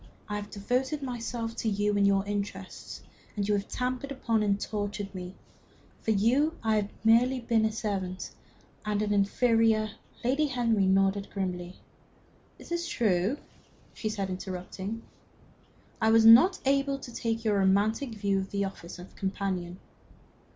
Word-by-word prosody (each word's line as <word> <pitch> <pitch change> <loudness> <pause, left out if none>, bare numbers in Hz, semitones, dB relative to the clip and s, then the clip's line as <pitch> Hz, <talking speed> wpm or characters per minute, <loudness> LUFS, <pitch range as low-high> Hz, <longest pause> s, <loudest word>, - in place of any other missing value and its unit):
I 210 - -2
have 205 0 -6
devoted 255 +8 -1
myself 235 -2 -4
to 225 - 0
you 205 0 +1
and 200 0 +4
your 195 0 +2
interests, 200 -2 -5 0.3
and 200 -1 -1
you 210 - +2
have 200 -1 -1
trampled 255 +2 -3
upon 230 -5 0
and 200 -1 +1
tortured 205 -2 -4
me. 180 0 -7 0.7
For - - -4
you 250 +10 +3
I 220 -1 +2
have 205 +1 -4
been 225 +1 +7
merely 250 0 -2 0.2
a - - -3
servant, 195 -4 -3 0.5
and 210 0 0
an 205 -1 0
inferior 220 +1 +3 0.2
" - - -25
Lady 275 +5 +2
Henry 230 -7 +1
nodded 195 +1 +2
grimly. 180 -2 -4 0.8
"It - - -14
is 345 0 -1
true," 210 - +1 0.6
she 215 - -3
said, 200 -3 -3
interrupting, 190 +4 -5 1.0
"I 220 - +4
was 225 0 +6
not 250 +12 +8
able 275 0 +2
to 245 -3 -10
take 230 0 -2
your 205 -2 +3
romantic 215 +6 +2
view 200 -2 +1
of 190 0 -4
the 200 0 -1
office 190 -3 -8
of 180 +1 -12
companion." 190 -2 -3
210 Hz, 155 wpm, -29 LUFS, 195-230 Hz, 1.0 s, not